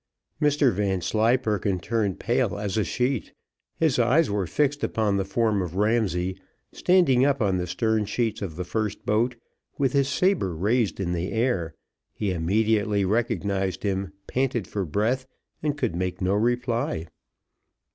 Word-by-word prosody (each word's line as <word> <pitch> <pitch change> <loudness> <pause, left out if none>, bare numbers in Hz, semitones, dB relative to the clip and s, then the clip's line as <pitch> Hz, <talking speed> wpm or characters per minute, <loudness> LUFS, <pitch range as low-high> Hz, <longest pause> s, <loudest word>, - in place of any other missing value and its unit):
Mr 145 -4 +3
Vanslyperken 105 +2 +1
turned 105 0 -1
pale - - 0
as 100 -2 -3
a 110 - +2
sheet; 125 +1 -1 0.4
his 155 -6 +2
eyes 125 +4 +3
were 100 -3 -1
fixed 145 - 0
upon 105 -3 +1
the 95 - +1
form 105 +1 +1
of 90 -1 -5
Ramsay, 95 -4 0 0.3
standing 175 -9 +4
up 140 -1 +2
on 100 -5 +1
the 90 0 -2
stern 110 +4 0
sheets 110 +1 -1
of 90 -6 -4
the 90 - -3
first 105 +2 -3
boat, 115 +4 +1 0.4
with 135 -1 +1
his 140 -1 +2
sabre 155 - +1
raised 105 +6 +1
in 90 -2 -1
the 90 +2 -2
air 110 - 0 0.4
he 100 -3 -1
immediately 105 +3 +1
recognised 100 -3 -1
him, 95 -2 -1
panted 125 -5 -1
for 100 -3 -3
breath, 115 - 0 0.3
and 150 -1 -1
could 85 - -1
make 90 0 -2
no 95 +1 +1
reply. 115 -5 0
105 Hz, 150 wpm, -25 LUFS, 95-125 Hz, 0.4 s, standing